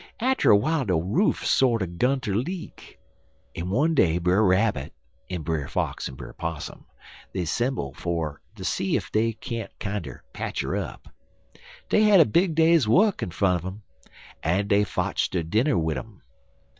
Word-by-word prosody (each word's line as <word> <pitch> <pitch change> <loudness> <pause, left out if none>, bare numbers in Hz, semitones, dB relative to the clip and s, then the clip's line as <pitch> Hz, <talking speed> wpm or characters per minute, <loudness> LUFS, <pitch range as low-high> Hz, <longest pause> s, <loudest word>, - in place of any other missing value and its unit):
Atter 260 +3 +2
w'ile 155 +8 +1
de 95 -4 +1
roof 100 - +1
sorter 115 -7 +3
'gun 125 +10 0
ter 105 -6 -2
leak, 170 - -5 0.6
en 85 +2 -4
one 145 - +2
day 85 - +3
Brer 90 +4 +2
Rabbit, 95 -6 +1 0.4
en 90 -4 -4
Brer 80 -4 -2
Fox, - - -2
en 65 - -10
Brer - - -9
Possum, 80 -3 -6 0.6
'semble 120 - -1
fer 80 -3 -3
ter 95 - -9
see 95 0 0
ef - - -7
dey 115 +1 +1
can't 110 -1 -6
kinder 100 - -5
patch - - -3
her - - -2
up. - - -5 0.8
Dey 215 - +4
had 210 -3 +6
a 160 - +8
big 170 - +2
day's 160 -5 +4
work 195 - +3
in - - -2
front 90 -1 +1
un - - -4
um, 105 +1 -14 0.6
en 95 +5 0
dey 100 0 +4
fotch 100 - -1
der 90 -3 -1
dinner 110 - +1
wid 80 -2 0
um. 110 -4 -13
100 Hz, 170 wpm, -25 LUFS, 85-135 Hz, 0.8 s, a